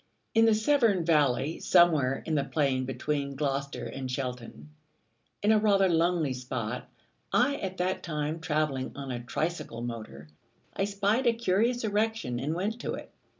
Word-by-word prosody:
In 225 0 +5
the 225 -1 +5
Severn 220 - +3
Valley, 145 -2 +2
somewhere 145 -6 +4
in 160 - -2
the 145 -2 +2
plain 135 -3 0
between 140 +2 -2
Gloucester 140 0 -2
and 130 -1 -5
Cheltenham, 125 - -5 0.7
in 210 - +4
a 215 - +5
rather 200 -2 +4
lonely 165 -4 +2
spot, 125 -2 -4 0.4
I 280 +3 +3
at 190 -1 -5
that 185 +1 -1
time 155 -1 -3
travelling 150 -5 -1
on 135 -2 -5
a 120 -1 -4
tricycle 140 -2 -3
motor, 110 - -7 0.5
I 195 - +1
spied 205 +5 +1
a 235 - +5
curious 230 +2 +1
erection, 215 - 0
and 150 +5 -2
went 210 +6 -2
to - - -3
it. - - -10
155 Hz, 155 wpm, -29 LUFS, 130-200 Hz, 0.7 s, In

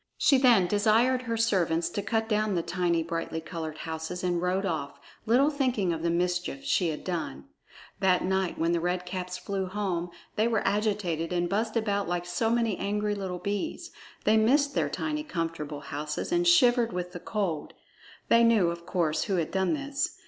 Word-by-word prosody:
She 275 -2 +4
then 240 -8 +5
desired 225 +6 +3
her 230 -2 -3
servants 175 -7 +1
to 205 - -3
cut 225 +2 -1
down 215 -2 +1
the 170 - 0
tiny, 175 -2 0
brightly 165 -1 -3
colored 160 -1 -6
houses 160 +3 -5
and 175 -1 0
rode 185 +2 0
off, 155 -6 -3 0.3
little 265 +6 +4
thinking 250 - 0
of 160 - -4
the 170 - 0
mischief 180 +9 -1
she 185 -9 +1
had 150 - -5
done. 160 - -4 0.5
That 185 -2 +3
night, 190 -1 0
when 165 +1 +1
the 170 - +2
Red 180 +1 -1
Caps 180 0 -4
flew 195 -1 -3
home, 185 -3 -2 0.3
they 215 +2 +3
were 225 -3 0
agitated 200 -6 0
and 175 -1 0
buzzed 220 +5 -1
about 205 -3 0
like 175 0 -2
so 225 +6 0
many 230 -3 +1
angry 210 +1 -1
little 190 -3 -4
bees. 200 - -4 0.3
They 215 +1 +4
missed 280 +6 +3
their - - +1
tiny 305 -1 -2
comfortable 165 - -4
houses 150 - -4
and 345 0 +2
shivered 245 -8 +5
with 180 -1 -4
the 175 - -7
cold. 180 -6 -3 0.5
They 230 0 +5
knew, 220 -7 +4
of 170 0 -8
course, 165 -4 0
who 195 - 0
had 165 -3 -1
done 190 +5 +1
this. 280 -1 -2
190 Hz, 185 wpm, -28 LUFS, 170-225 Hz, 0.5 s, then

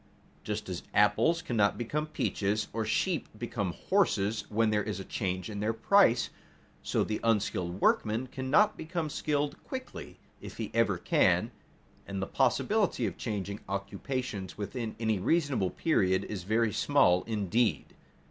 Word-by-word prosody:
Just - - -4
as - - -4
apples 165 0 +3
cannot 105 -4 +1
become 150 +6 -2
peaches 105 -7 -1
or 115 0 -1
sheep 160 - 0
become 105 -6 -3
horses 110 - +1
when 110 +1 +2
there 105 -1 +2
is 105 -2 -4
a 95 - -6
change 95 -4 -3
in 105 -2 -5
their 110 +2 0
price, 125 - +4 0.5
so - - 0
the 110 - -2
unskilled 100 -5 0
workman 110 +5 +2
cannot 130 +11 +2
become 160 -1 -3
skilled 145 -1 -1
quickly, 260 -1 -7 0.2
if - - -9
he - - -4
ever - - +2
can, - - +2 0.6
and - - -4
the - - -1
possibility 210 -2 +1
of - - -3
changing 100 -2 -4
occupations 100 +1 -4
within 110 +2 -4
any 110 -3 +1
reasonable 140 - +1
period 95 - +1
is 95 -5 -6
very 110 +1 +1
small 90 0 +4
indeed. 105 - 0
110 Hz, 145 wpm, -30 LUFS, 100-140 Hz, 0.6 s, price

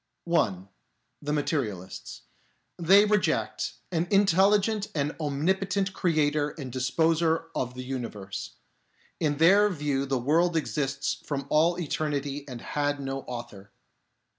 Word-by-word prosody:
(1) 100 - 0 0.5
The 150 0 -3
Materialists. 120 - -3 0.6
They 195 +5 +6
reject 210 -2 0 0.2
an 170 0 0
intelli 195 +1 +5
gent 210 0 -2
and 145 0 -1
omnipotent 190 +6 0
Creator 150 -4 +1
and 135 -5 -6
Disposer 160 +5 +1
of 125 0 -3
the 130 - -6
Universe. 105 - -6 0.6
In 150 -3 0
their 195 +6 +6
view 145 -6 -1
the 135 -1 +1
world 165 +7 +2
exists 140 -3 -2
from 140 -2 -3
all 165 +3 +3
eternity 145 -3 -2
and 125 -3 -7
had 145 -1 -1
no 135 0 -3
author. 115 -5 -8
150 Hz, 120 wpm, -27 LUFS, 135-170 Hz, 0.6 s, They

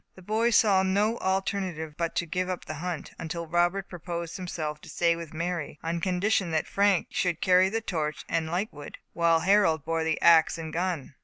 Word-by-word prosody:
The 185 - -14
boys 220 +4 +1
saw 200 -4 +5
no 205 +4 +1
alternative 190 -4 -2
but 170 0 -2
to 170 - 0
give 180 +3 -2
up 185 - -4
the - - -5
hunt, 175 -4 -4
until 170 +1 -4
Robert 175 +4 +1
proposed 170 -1 -6
himself 155 -5 -4
to - - -13
stay 170 -1 +2
with 165 -2 -8
Mary, 165 -2 -3
on 165 +1 -2
condition 185 +1 +1
that 160 -1 0
Frank 200 -3 +2
should 175 -3 0
carry 185 +1 +4
the 225 +2 -2
torch 155 -7 -3
and 165 -1 -1
light 190 +5 -2
wood, 145 -1 -10 0.2
while 165 -1 +3
Harold 180 -5 +3
bore 165 0 0
the 160 -1 0
ax 165 -1 +5
and 160 -1 -6
gun. 175 -5 -2
175 Hz, 200 wpm, -27 LUFS, 160-190 Hz, 0.2 s, saw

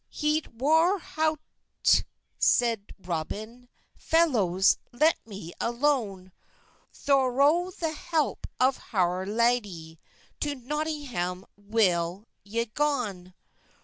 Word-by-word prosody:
"Heyt 300 0 0
war 320 - +3
howte," 315 -3 0 0.4
seyde 230 -4 +2
Roben, 210 +8 -5 0.3
"Felowhes, 210 - +3
let 305 +7 +3
me 195 -5 -8
alone; 235 -7 0 0.6
Thorow 280 +6 +2
the 330 -3 -3
helpe 315 -1 -2
of 260 +1 +3
howr 185 -2 0
ladey, 205 -8 0 0.4
To 290 -1 -2
Notynggam 260 - -3
well 200 -3 0 0.2
y 230 +4 -2
gon." 215 -12 -2
240 Hz, 85 wpm, -27 LUFS, 190-295 Hz, 0.6 s, war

